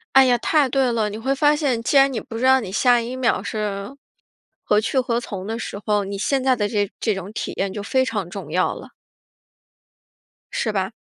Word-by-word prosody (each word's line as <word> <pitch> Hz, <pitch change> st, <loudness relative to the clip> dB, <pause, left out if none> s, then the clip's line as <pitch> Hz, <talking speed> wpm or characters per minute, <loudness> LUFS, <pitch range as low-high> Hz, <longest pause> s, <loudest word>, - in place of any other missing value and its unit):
哎 270 Hz, 0 st, +8 dB
呀， 245 Hz, -1 st, +4 dB
太 290 Hz, +2 st, +2 dB
对 260 Hz, -1 st, +1 dB
了， 220 Hz, -2 st, 0 dB
你 210 Hz, -, -6 dB
会 260 Hz, +5 st, -1 dB
发 295 Hz, +1 st, +3 dB
现， 265 Hz, -7 st, 0 dB
既 280 Hz, -, 0 dB
然 275 Hz, 0 st, +6 dB
你 225 Hz, -, -2 dB
不 225 Hz, -, -9 dB
知 240 Hz, -, -2 dB
道 265 Hz, 0 st, +5 dB
你 195 Hz, -, -6 dB
下 245 Hz, +4 st, +3 dB
一 240 Hz, +2 st, -5 dB
秒 255 Hz, -1 st, +1 dB
是 210 Hz, +3 st, -4 dB, 0.7 s
何 210 Hz, -, +2 dB
去 225 Hz, +5 st, 0 dB
何 240 Hz, -2 st, -1 dB
从 195 Hz, -5 st, -6 dB
的 225 Hz, +2 st, -3 dB
时 205 Hz, -3 st, -6 dB
候， 210 Hz, -1 st, +1 dB
你 200 Hz, 0 st, -5 dB
现 265 Hz, +5 st, 0 dB
在 260 Hz, -1 st, +4 dB
的 210 Hz, -4 st, -1 dB
这 205 Hz, -2 st, -1 dB
这 220 Hz, -, +1 dB
种 195 Hz, +1 st, -7 dB
体 -, -, -4 dB
验 195 Hz, -1 st, -1 dB
就 205 Hz, -, -5 dB
非 260 Hz, +6 st, +1 dB
常 205 Hz, -8 st, -3 dB
重 195 Hz, +2 st, -8 dB
要 -, -, +1 dB
了。 -, -, -10 dB, 1.6 s
是 225 Hz, -, -1 dB
吧？ 190 Hz, +1 st, -1 dB
230 Hz, 240 characters per minute, -22 LUFS, 205-260 Hz, 1.6 s, 哎